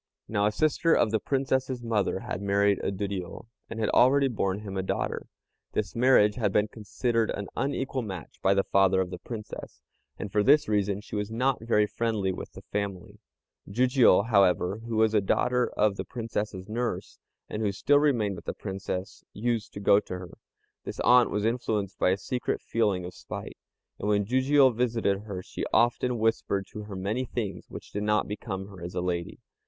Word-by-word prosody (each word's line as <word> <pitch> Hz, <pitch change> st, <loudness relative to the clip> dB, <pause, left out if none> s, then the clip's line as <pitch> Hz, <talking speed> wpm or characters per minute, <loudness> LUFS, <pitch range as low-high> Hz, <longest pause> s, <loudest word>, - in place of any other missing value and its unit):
Now 105 Hz, -1 st, +1 dB
a -, -, +1 dB
sister 155 Hz, +7 st, +2 dB
of 110 Hz, -, +2 dB
the 110 Hz, -, +2 dB
Princess's 130 Hz, -1 st, -1 dB
mother 105 Hz, -4 st, 0 dB
had 90 Hz, -, -4 dB
married 100 Hz, 0 st, +2 dB
a -, -, -1 dB
Duriô, 95 Hz, -1 st, -4 dB, 0.2 s
and 115 Hz, -, -6 dB
had 110 Hz, -, +1 dB
already 135 Hz, +2 st, +5 dB
borne 100 Hz, -4 st, -1 dB
him 100 Hz, -2 st, -7 dB
a 95 Hz, -, 0 dB
daughter. 95 Hz, -, -2 dB, 0.5 s
This 105 Hz, -3 st, -2 dB
marriage 115 Hz, -4 st, +4 dB
had 105 Hz, -5 st, +1 dB
been 105 Hz, +2 st, +2 dB
considered 115 Hz, +1 st, -1 dB
an 100 Hz, -2 st, -4 dB
unequal 135 Hz, -1 st, -1 dB
match 95 Hz, -, -7 dB
by 95 Hz, +1 st, +3 dB
the 100 Hz, -, +3 dB
father 95 Hz, -1 st, +3 dB
of 95 Hz, -1 st, -1 dB
the 90 Hz, -, -6 dB
Princess, 105 Hz, 0 st, -8 dB, 0.3 s
and 105 Hz, -, -6 dB
for 105 Hz, -, +3 dB
this 145 Hz, +7 st, +5 dB
reason 105 Hz, -1 st, 0 dB
she 105 Hz, -, -8 dB
was 105 Hz, 0 st, -2 dB
not 125 Hz, +3 st, 0 dB
very 105 Hz, -2 st, +3 dB
friendly 105 Hz, -3 st, -1 dB
with 90 Hz, -, -7 dB
the -, -, -11 dB
family. 100 Hz, -3 st, -4 dB, 0.5 s
Jijiû, 125 Hz, -3 st, +4 dB
however, 100 Hz, -2 st, +3 dB
who 115 Hz, -, -3 dB
was 110 Hz, 0 st, +3 dB
a 105 Hz, -, +4 dB
daughter 125 Hz, +5 st, +1 dB
of 105 Hz, -2 st, +2 dB
the -, -, -2 dB
Princess's 105 Hz, -5 st, -4 dB
nurse, 115 Hz, +2 st, -3 dB, 0.3 s
and 105 Hz, -, -4 dB
who 105 Hz, -2 st, +1 dB
still 145 Hz, +9 st, +3 dB
remained 115 Hz, -10 st, +1 dB
with 85 Hz, -, -11 dB
the -, -, -4 dB
Princess, 95 Hz, -1 st, -5 dB
used 115 Hz, 0 st, -1 dB
to -, -, -6 dB
go 100 Hz, 0 st, +5 dB
to 90 Hz, -, -6 dB
her. 90 Hz, -2 st, -9 dB, 0.5 s
This -, -, -7 dB
aunt 125 Hz, -1 st, +6 dB
was 105 Hz, 0 st, -1 dB
influenced 110 Hz, -4 st, -1 dB
by -, -, +3 dB
a 95 Hz, -, +2 dB
secret 125 Hz, +5 st, -2 dB
feeling 105 Hz, -6 st, 0 dB
of 90 Hz, -, -7 dB
spite, -, -, -8 dB, 0.4 s
and 105 Hz, -, -2 dB
when 100 Hz, -1 st, +2 dB
Jijiû 130 Hz, +2 st, +4 dB
visited 110 Hz, -4 st, 0 dB
her 95 Hz, -4 st, -5 dB
she -, -, -6 dB
often 120 Hz, +1 st, +2 dB
whispered 110 Hz, -3 st, 0 dB
to 105 Hz, -1 st, -7 dB
her 105 Hz, -2 st, -7 dB
many 100 Hz, +7 st, -1 dB
things 115 Hz, -5 st, -4 dB
which -, -, -10 dB
did 105 Hz, -, -3 dB
not 105 Hz, -1 st, +1 dB
become 100 Hz, -2 st, -5 dB
her 95 Hz, -3 st, -12 dB
as 85 Hz, -, -6 dB
a 90 Hz, -, 0 dB
lady. 85 Hz, -1 st, -3 dB
105 Hz, 195 wpm, -28 LUFS, 100-120 Hz, 0.5 s, aunt